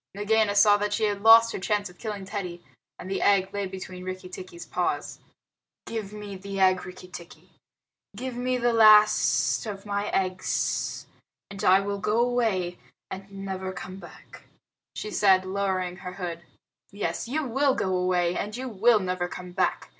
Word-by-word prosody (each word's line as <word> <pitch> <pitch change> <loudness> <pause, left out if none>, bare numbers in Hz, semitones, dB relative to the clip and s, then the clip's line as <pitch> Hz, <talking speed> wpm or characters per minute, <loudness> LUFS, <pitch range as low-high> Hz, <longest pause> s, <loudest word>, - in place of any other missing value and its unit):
Nagaina 210 0 +2
saw 205 0 +6
that 205 0 -2
she 225 - -1
had 205 -1 0
lost 230 +1 +8
her - - -4
chance 205 +2 -1
of 180 -1 -16
killing 210 -3 -5
Teddy, 180 -4 -6 0.3
and - - -9
the 195 - -2
egg 195 -2 +3
lay 200 -1 -2
between 185 -1 -8
Rikki 185 0 -6
tikki's 185 -2 -9
paws. - - -2 0.7
"Give 215 -3 -5
me 210 -1 -8
the 195 +1 -6
egg, 185 -1 +3
Rikki 185 0 -11
tikki. 175 -1 -12 0.6
Give 250 +3 -5
me 250 +1 -1
the 240 -1 +1
last 215 0 +5
of 195 -1 -6
my 205 0 -2
eggs, 185 -1 -1 0.5
and 200 -1 -7
I 190 +2 +5
will 200 0 -3
go 210 +4 0
away 225 -8 0 0.3
and 195 +1 -8
never 190 -1 -4
come 185 0 -8
back," - - -14 0.5
she 210 - -5
said, 190 -2 +4
lowering 185 -2 -2
her 185 -1 -8
hood. 175 -3 -5 0.5
"Yes, 195 -1 -3
you 305 +6 -1
will 270 +2 +1
go 190 -1 -1
away, 180 -1 +1
and 210 +3 -4
you 260 +1 -5
will 225 +1 +4
never 180 -2 -2
come 180 0 -8
back. 175 - -1
195 Hz, 170 wpm, -26 LUFS, 185-215 Hz, 0.7 s, lost